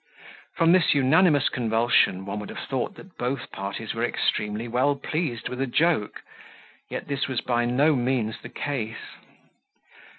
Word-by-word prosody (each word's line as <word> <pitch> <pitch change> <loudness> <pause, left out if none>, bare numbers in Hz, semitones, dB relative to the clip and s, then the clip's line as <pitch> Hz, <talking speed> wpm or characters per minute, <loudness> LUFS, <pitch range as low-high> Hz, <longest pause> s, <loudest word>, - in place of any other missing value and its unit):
From 165 -1 +4
this 180 -5 +4
unanimous 145 +2 +4
convulsion, 115 -5 +2
one 100 +1 -4
would 105 - -7
have - - -7
thought 130 -2 -2
that 185 +1 -15
both 125 +3 -3
parties 100 +3 -5
were 115 - -2
extremely 105 -1 -1
well 130 +5 +2
pleased 140 -3 -3
with 125 +1 -5
a 135 - 0
joke, 150 -4 +1 0.7
yet - - -5
this 140 -1 -1
was 130 -4 -1
by 120 -1 0
no 140 +6 +3
means 120 -3 0
the - - -9
case. 120 -6 -3
125 Hz, 155 wpm, -25 LUFS, 115-145 Hz, 0.7 s, From